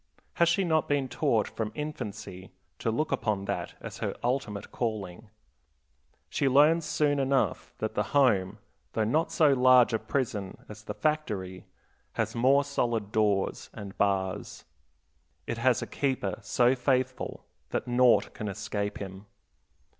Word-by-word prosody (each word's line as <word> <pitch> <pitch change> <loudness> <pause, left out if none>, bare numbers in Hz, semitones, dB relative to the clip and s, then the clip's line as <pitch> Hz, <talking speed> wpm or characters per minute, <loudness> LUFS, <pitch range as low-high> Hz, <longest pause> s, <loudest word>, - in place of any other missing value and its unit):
Has 170 0 +3
she 185 +3 +2
not 160 -3 +1
been 140 -2 +1
taught 120 -6 +1
from 110 -2 -4
infancy 105 - -6 0.3
to - - -1
look 135 +8 -1
upon 110 -6 -1
that - - -3
as - - -8
her - - -2
ultimate 120 -5 -2
calling? 110 -3 -4 1.0
She 135 - +1
learns 150 +5 +5
soon 145 -2 +1
enough 135 0 0
that - - -3
the - - 0 0.2
home, 105 -9 +3 0.4
though 110 - +1
not 150 +10 +1
so 150 -3 +4
large 125 -2 +5
a 110 - +2
prison 105 -8 -3
as 105 0 -11
the - - -5
factory, 105 - -2 0.5
has - - -1
more 135 +4 +4
solid 120 -7 -1
doors 105 -3 0
and 100 -1 -8
bars. 95 -2 -1 0.8
It 115 - -4
has 125 +1 +2
a - - -3
keeper 130 -9 -2
so 120 +4 +3
faithful 130 0 -1 0.2
that - - -2
naught 125 0 +4
can 110 - -5
escape 105 0 -3
him. 95 +1 -8
120 Hz, 145 wpm, -28 LUFS, 105-140 Hz, 1.0 s, learns